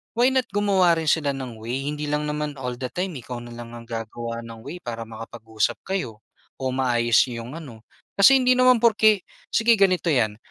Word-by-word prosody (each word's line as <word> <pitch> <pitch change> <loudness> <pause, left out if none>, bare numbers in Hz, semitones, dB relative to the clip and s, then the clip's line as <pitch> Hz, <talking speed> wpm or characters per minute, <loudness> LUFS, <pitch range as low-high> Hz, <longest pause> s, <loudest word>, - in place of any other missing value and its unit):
why 240 +2 +4
not 260 -1 +1
gumawa 195 -4 +3
rin 165 -1 -3
sila 145 -3 +1
ng 125 -4 -7
way. 130 +5 -3
Hindi 150 0 -4
lang 150 +1 -1
naman 150 -1 -3
all 125 -1 -4
the 130 - -3
time 185 +1 -2
ikaw 125 0 -7
na 120 - -10
lang 120 0 -9
ang 120 - -9
gagawa 115 0 -5
ng 115 -1 -10
way 180 - -7
para 115 -6 -6
makapag-usap 110 -1 -3
kayo 125 - -4 0.4
o 130 -1 -1
maayos 120 -3 +3
'yong 120 +4 -7
ano. 115 -8 -12 0.3
Kasi 265 +7 +7
hindi 255 0 +4
naman 255 -1 +5
porke, 215 -3 +4 0.3
sige 230 +1 +4
ganito 190 -4 +2
'yan, 110 -9 +1
135 Hz, 195 wpm, -24 LUFS, 115-190 Hz, 0.4 s, Kasi